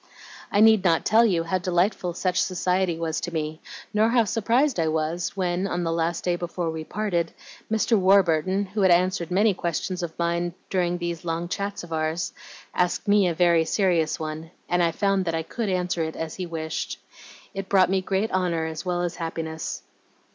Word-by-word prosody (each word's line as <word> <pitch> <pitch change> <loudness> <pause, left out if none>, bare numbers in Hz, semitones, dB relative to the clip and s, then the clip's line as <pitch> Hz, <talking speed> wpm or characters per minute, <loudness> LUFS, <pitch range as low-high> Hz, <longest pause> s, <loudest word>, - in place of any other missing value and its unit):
"I 205 - +3
need 220 -2 +6
not 165 -3 +2
tell 230 +2 +5
you 170 -5 +1
how 185 +3 -1
delightful 180 0 0
such 185 0 +1
society 180 -1 0
was 165 -1 -2
to 175 - -4
me, 155 0 -3 0.3
nor 215 +2 +3
how 235 0 +4
surprised 230 +4 +1
I 160 - +2
was 160 +4 -2
when, 180 0 0
on 175 -2 -2
the 165 - -1
last 165 0 -1
day 175 -1 +1
before 175 -1 -3
we 160 0 -5
parted, 175 -3 -1 0.4
Mr. 220 +1 +2
Warburton, 190 0 +3
who 200 +2 -3
had 190 - +5
answered 180 -1 +2
many 205 +3 +3
questions 175 +1 -3
of 170 -2 -5
mine 170 0 -1 0.2
during 175 -2 +1
these 170 -2 -4
long 165 0 -2
chats 200 0 -3
of 170 -1 -7
ours, 160 +4 -1 0.4
asked 180 +2 0
me 205 -2 +4
a 170 - -1
very 170 -1 +4
serious 170 -2 +1
one, 155 +1 -5 0.2
and 175 0 +1
I 170 -1 +3
found 195 +1 +1
that 165 -1 -1
I 160 - -1
could 220 +5 -3
answer 180 -2 0
it 160 0 -4
as 160 -1 -4
he 185 -2 -5
wished. 160 -1 -4 0.5
It 195 -1 -5
brought 190 -2 +4
me 190 -1 +2
great 195 +3 -1
honor 175 -3 0
as 160 -1 -5
well 175 -1 -1
as 175 - -3
happiness. 160 -1 -4
175 Hz, 195 wpm, -25 LUFS, 165-190 Hz, 0.5 s, need